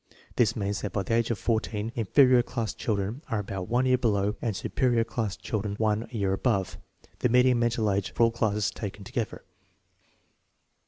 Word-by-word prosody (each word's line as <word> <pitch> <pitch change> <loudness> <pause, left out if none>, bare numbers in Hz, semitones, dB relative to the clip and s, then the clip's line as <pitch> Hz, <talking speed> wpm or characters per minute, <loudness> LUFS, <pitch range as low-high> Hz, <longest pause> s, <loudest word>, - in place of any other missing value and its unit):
This - - +3
means 100 0 -2
that 105 - -4
by 100 - 0
the 115 - -2
age 115 0 +2
of 115 - 0
14 110 -1 -1
inferior 125 +3 +5
class 120 -2 -3
children 105 +4 -2
are 115 - 0
about 95 -3 -4
one 125 +2 +2
year 130 -1 +3
below, 105 -3 +1
and 110 -4 -1
superior 120 +2 +1
class 115 -3 -3
children 105 -2 -3
one 110 +1 0
year 100 -5 -1
above, 95 -2 0 0.4
the 125 - +2
median 125 0 +4
mental 115 -3 +1
age 100 0 -1
for - - +1
all 115 - +4
classes 105 -2 0
taken 100 -1 -7
together. 110 +3 -4
110 Hz, 175 wpm, -27 LUFS, 100-120 Hz, 0.4 s, inferior